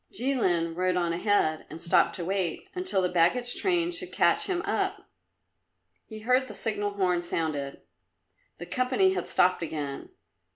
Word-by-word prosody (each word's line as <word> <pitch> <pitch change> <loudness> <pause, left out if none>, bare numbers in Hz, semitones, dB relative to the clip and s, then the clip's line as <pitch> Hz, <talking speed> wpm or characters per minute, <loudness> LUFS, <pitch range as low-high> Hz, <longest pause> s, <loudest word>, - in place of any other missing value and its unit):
Jilin 185 -9 +1
rode 185 +1 0
on 170 -2 0
ahead 170 -4 0
and 160 - -9
stopped 170 - +3
to 175 - -5
wait 190 -2 -2
until 365 - 0
the - - +2
baggage 180 +9 +3
train 350 -2 +1
should 355 +1 -1
catch - - +2
him 360 -1 -1
up. - - -2 1.0
He 215 -1 -9
heard 255 +3 +2
the 210 - -9
signal 205 -2 -2
horn 180 -3 +1
sounded; 155 -5 -3 0.7
the 175 - -7
company 260 - +1
had - - -3
stopped 180 0 +2
again. 150 -4 -5
190 Hz, 155 wpm, -27 LUFS, 170-255 Hz, 1.0 s, stopped